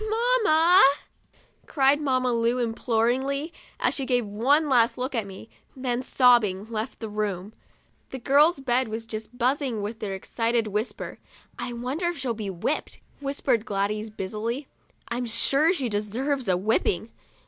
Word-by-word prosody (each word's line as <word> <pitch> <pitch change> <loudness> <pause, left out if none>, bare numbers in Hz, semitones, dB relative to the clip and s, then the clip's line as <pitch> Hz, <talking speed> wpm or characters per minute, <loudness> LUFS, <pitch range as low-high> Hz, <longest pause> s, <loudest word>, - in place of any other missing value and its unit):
"Mamma!' 430 -8 +4 0.9
cried 280 +1 +3
Mamma 255 -3 +1
Lu, 235 +1 +1
imploringly, 250 +6 0 0.3
as - - +2
she 275 - -2
gave 250 -3 +1
one 260 +10 +2
last 240 -4 +3
look 255 +2 -3
at 225 -5 -2
me, 195 +3 -10 0.3
then, 255 -2 -2
sobbing, 235 -7 +3
left 220 +3 -4
the 225 - -5
room. 210 -2 -3 0.6
The 265 - -6
girls' 285 +5 +3
bed 255 -1 +1
was 220 +1 -5
just 220 +1 -7
buzzing 255 -3 0
with 220 +2 -5
their 195 -2 -3
excited 230 +4 -1
whispering. 210 +3 -4 0.4
4 - - -3
1 240 -1 -6
wonder 295 +8 -1
if 345 - -2
she'll 260 -4 -2
be 215 -3 -5
whipped 190 - -3
?" - - -34
whispered 275 -5 0
Gladys, 210 0 -2
busily; 215 +6 -4 0.2
" - - -38
I'm 240 +1 -2
sure 275 +8 +3
she 280 -9 -1
deserves 235 +5 -2
a 185 -2 +2
whipping." 215 +1 0
240 Hz, 160 wpm, -25 LUFS, 215-275 Hz, 0.9 s, Mamma